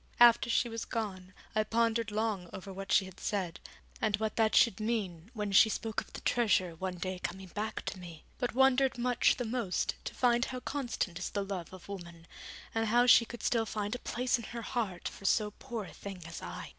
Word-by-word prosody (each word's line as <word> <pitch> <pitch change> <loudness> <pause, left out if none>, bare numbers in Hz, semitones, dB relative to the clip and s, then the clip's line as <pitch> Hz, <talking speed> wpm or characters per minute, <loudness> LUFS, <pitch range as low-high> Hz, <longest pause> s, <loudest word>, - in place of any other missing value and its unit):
After 235 0 +7
she 235 - +3
was 230 -1 -4
gone 190 -5 -4 0.2
I 215 -1 +2
pondered 230 0 +1
long 210 -4 -1
over 190 +1 -7
what 195 +1 -6
she 195 - +5
had 190 -1 -12
said, 190 -5 -2 0.4
and 215 -2 +2
what 220 0 -2
that 220 -1 +3
should 225 -4 +5
mean 205 -6 -2
when 210 -2 -2
she 195 +3 +7
spoke 220 0 -2
of - - -14
the - - -7
treasure 205 -7 +2
one 185 +2 -3
day 185 +1 -4
coming 190 +1 -5
back 215 +4 -4
to 190 - -4
me: 170 -3 -10 0.2
but 245 -2 -1
wondered 265 0 +4
much 245 0 +3
the 245 - -3
most 225 -5 -1
to - - -5
find 240 0 +3
how 255 - -5
constant 240 -12 -2
is - - -3
the 200 -1 -2
love 190 -4 -5
of 185 -1 -11
woman, 170 -4 -8 0.5
and 225 0 +1
how 240 +3 +5
she 240 -1 +7
could 235 -1 -9
still 225 -2 +2
find 210 -1 -2
a 250 - -3
place 245 0 0
in 230 - -7
her 235 -1 -6
heart 205 -7 -2
for 195 - -9
so 210 +2 +3
poor 235 -2 -6
a - - -11
thing 195 -3 -8
as 165 0 -7
I. - - -6
215 Hz, 220 wpm, -32 LUFS, 190-235 Hz, 0.5 s, After